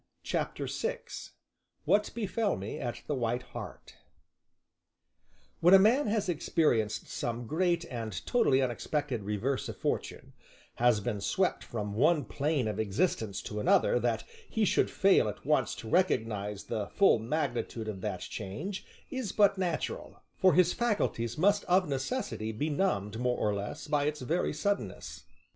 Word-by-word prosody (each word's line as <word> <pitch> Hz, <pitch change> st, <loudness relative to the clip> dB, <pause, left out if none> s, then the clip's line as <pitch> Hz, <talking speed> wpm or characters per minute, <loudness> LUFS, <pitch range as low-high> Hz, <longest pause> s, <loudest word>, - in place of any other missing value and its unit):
CHAPTER -, -, -2 dB
VI 485 Hz, +1 st, -2 dB, 0.8 s
WHAT 210 Hz, 0 st, +3 dB
BEFELL 220 Hz, -1 st, 0 dB
ME 100 Hz, +3 st, -5 dB
AT 120 Hz, -1 st, -4 dB
"THE -, -, -2 dB
WHITE 120 Hz, -2 st, -1 dB
HART" -, -, -9 dB, 1.6 s
When 175 Hz, +3 st, +7 dB
a -, -, +11 dB
man 225 Hz, +8 st, +4 dB
has 210 Hz, -1 st, 0 dB
experienced 125 Hz, -10 st, +1 dB
some 120 Hz, 0 st, -3 dB
great 170 Hz, +4 st, +1 dB
and 115 Hz, -, -5 dB
totally 140 Hz, -, +3 dB
unexpected 130 Hz, 0 st, -2 dB
reverse 105 Hz, +7 st, -2 dB
of -, -, -7 dB
fortune, -, -, -3 dB, 0.4 s
has 120 Hz, -3 st, +3 dB
been 105 Hz, -1 st, -3 dB
swept 185 Hz, -, 0 dB
from 105 Hz, -3 st, -4 dB
one 150 Hz, +7 st, +3 dB
plane 145 Hz, -4 st, 0 dB
of 105 Hz, 0 st, -3 dB
existence 110 Hz, -, 0 dB
to 105 Hz, -3 st, -5 dB
another, 485 Hz, -, +3 dB
that -, -, 0 dB, 0.3 s
he 220 Hz, -1 st, +1 dB
should -, -, +2 dB
fail 195 Hz, -, +4 dB
at 105 Hz, -, -9 dB
once 135 Hz, -6 st, +2 dB
to 115 Hz, -, -9 dB
recognize 110 Hz, -, 0 dB
the 105 Hz, -2 st, -3 dB
full 195 Hz, -, +4 dB
magnitude 120 Hz, -3 st, -2 dB
of 100 Hz, -3 st, -5 dB
that -, -, -3 dB
change 165 Hz, -, -5 dB, 0.3 s
is 260 Hz, -8 st, -3 dB
but 200 Hz, -2 st, +4 dB
natural, 185 Hz, -, -3 dB
for 185 Hz, -2 st, +4 dB
his 180 Hz, 0 st, +5 dB
faculties 200 Hz, -, 0 dB
must 205 Hz, +5 st, +3 dB
of 180 Hz, 0 st, +3 dB
necessity 135 Hz, -, -2 dB
be 145 Hz, +8 st, -2 dB
numbed 115 Hz, -, 0 dB
more 125 Hz, 0 st, +1 dB
or 105 Hz, -, +1 dB
less 100 Hz, 0 st, -5 dB
by 145 Hz, -1 st, +1 dB
its 150 Hz, -1 st, -2 dB
very 165 Hz, +8 st, 0 dB
suddenness. 200 Hz, +7 st, -3 dB
145 Hz, 150 wpm, -30 LUFS, -, 1.6 s, a